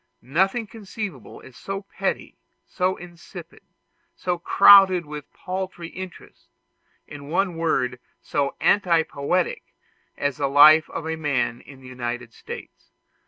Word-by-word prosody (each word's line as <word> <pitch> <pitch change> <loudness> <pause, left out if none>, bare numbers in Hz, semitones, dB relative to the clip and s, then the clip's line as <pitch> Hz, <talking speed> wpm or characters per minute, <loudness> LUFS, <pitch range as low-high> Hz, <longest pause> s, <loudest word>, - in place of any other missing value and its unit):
Nothing 190 - 0
conceivable 200 - -8
is 130 - -15
so 195 +6 -6
petty, - - -4 0.3
so 185 0 -1
insipid, 175 -1 -12 0.5
so 180 - -2
crowded 190 -1 +6
with 150 -1 -9
paltry 185 -2 -6
interests, 185 0 -11 0.6
in 145 -1 -11
one 180 +1 0
word 130 -6 -1 0.2
so 140 -1 -2
anti 175 -5 +3
poetic, 160 +5 -2 0.4
as 145 -2 -2
the 140 - 0
life 155 +3 +7
of 165 - -6
a 160 - -2
man 140 -6 -1
in 135 -1 -15
the 130 - -13
United 120 -2 -5
States. - - -11
165 Hz, 125 wpm, -23 LUFS, 140-185 Hz, 0.6 s, life